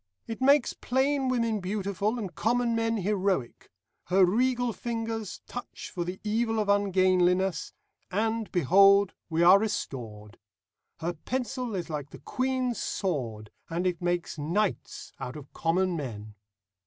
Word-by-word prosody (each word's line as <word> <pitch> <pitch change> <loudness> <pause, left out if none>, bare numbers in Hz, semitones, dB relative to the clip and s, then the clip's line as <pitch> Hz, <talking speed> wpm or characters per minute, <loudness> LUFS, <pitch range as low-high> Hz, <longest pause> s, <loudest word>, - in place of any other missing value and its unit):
It 225 +2 -6
makes 275 0 +4
plain 265 +1 0
women 230 -4 +1
beautiful, 200 +3 -1
and 195 -6 -5
common 235 +1 +1
men 225 0 +1
heroic. 195 - -1 0.4
Her 185 +1 +5
regal 245 +4 +1
fingers 225 -3 -4
touch 245 - -8
for 175 - -2
the 180 +2 -5
evil 225 +1 0
of 210 -2 0
ungainliness, 185 -3 +2 0.4
and, 220 +2 -1
behold, 195 +4 +5 0.2
we 165 +1 +2
are 185 +3 +8
restored. 115 - -4 0.6
Her 170 +2 -1
pencil 250 - -3
is 175 -3 -3
like 145 -2 -4
the - - -11
Queen's 255 -2 -1
sword, 115 - -3 0.2
and 170 +2 -2
it 180 -2 0
makes 175 -2 -1
knights 180 +7 -2
out 125 - -5
of 150 -2 -11
common 180 +2 +1
men. 110 -8 -6
195 Hz, 135 wpm, -28 LUFS, 175-230 Hz, 0.6 s, are